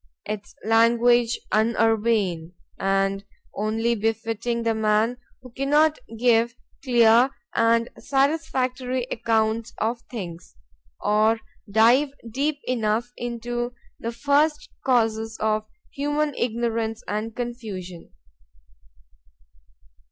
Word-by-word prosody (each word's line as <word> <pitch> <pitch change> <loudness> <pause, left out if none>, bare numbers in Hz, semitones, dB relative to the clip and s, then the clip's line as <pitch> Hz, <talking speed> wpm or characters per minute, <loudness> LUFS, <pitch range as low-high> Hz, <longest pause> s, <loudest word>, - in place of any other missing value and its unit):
—'Tis 205 -1 -6
language 235 +1 +4
unurbane,—and 195 -3 0 0.3
only 220 +3 0
befitting 225 +1 -1
the 230 -1 +1
man 220 +2 +2 0.3
who 250 - -12
cannot 295 +4 +2 0.2
give 235 0 +3 0.3
clear 240 -1 +5 0.2
and 230 0 +3
satisfactory 260 -3 0
accounts 225 0 0
of 230 +2 -1
things, 175 - -7 0.5
or 215 +2 +3 0.3
dive 235 +7 +5 0.2
deep 285 +5 0
enough 235 0 -1
into 240 0 -4 0.2
the 230 - -3
first 290 +5 +1
causes 225 -3 +1
of 215 0 0 0.2
human 295 +1 -1
ignorance 230 -1 -2
and 215 +2 -3
confusion. 210 -8 -6
230 Hz, 85 wpm, -24 LUFS, 220-245 Hz, 0.5 s, clear